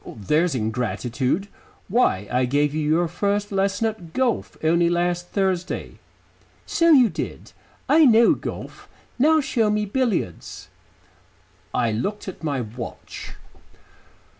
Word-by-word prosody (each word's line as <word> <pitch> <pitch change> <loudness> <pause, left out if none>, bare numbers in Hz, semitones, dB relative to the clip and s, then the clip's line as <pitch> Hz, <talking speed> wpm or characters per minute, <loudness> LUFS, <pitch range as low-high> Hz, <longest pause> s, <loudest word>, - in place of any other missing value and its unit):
"There's 150 - +1
ingratitude. 125 - -1 0.4
Why, 180 - +1
I 125 +1 +2
gave 145 +3 +1
you 155 - -1
your 170 +2 +2
first 200 +4 -1
lesson 195 +2 0
at 210 -7 -4
golf 255 -3 -1
only 170 +2 +3
last 175 0 0
Thursday." 185 -2 -2 0.7
"So 335 0 +2
you 260 -6 +7
did. 175 -5 -6 0.4
I 315 0 +6
know 230 -2 +6
golf. - - -7 0.3
Now 310 +4 +5
show 225 -5 +1
me 210 0 0
billiards." 205 - -2 1.0
I 120 -2 +1
looked 200 - -3
at 185 - -8
my 140 -4 -1
watch. 120 +2 -8
175 Hz, 120 wpm, -23 LUFS, 140-210 Hz, 1.0 s, you